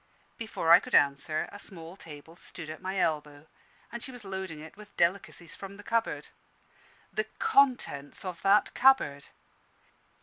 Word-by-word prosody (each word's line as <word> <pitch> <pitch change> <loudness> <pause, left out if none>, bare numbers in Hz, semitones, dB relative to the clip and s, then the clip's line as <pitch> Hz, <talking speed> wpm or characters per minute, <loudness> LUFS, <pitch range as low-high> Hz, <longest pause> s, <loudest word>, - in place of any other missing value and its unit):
Before 220 -7 -1
I - - +10
could - - -2
answer, 145 +2 +2
a 205 - -10
small 170 -3 -7
table 160 -2 -12
stood 160 -2 -9
at 155 - -9
my 190 +1 -3
elbow, 150 -4 -1 0.5
and 235 0 -6
she 260 - -5
was 245 -3 -11
loading 190 -5 -5
it 160 +1 -11
with 210 0 -15
delicacies 170 -2 0
from 195 0 -9
the 205 - -11
cupboard. 230 0 -1 0.8
The 435 - 0
contents 255 - +2
of 180 -2 -5
that 200 +2 +4
cupboard! 245 - +4
185 Hz, 155 wpm, -29 LUFS, 155-210 Hz, 0.8 s, I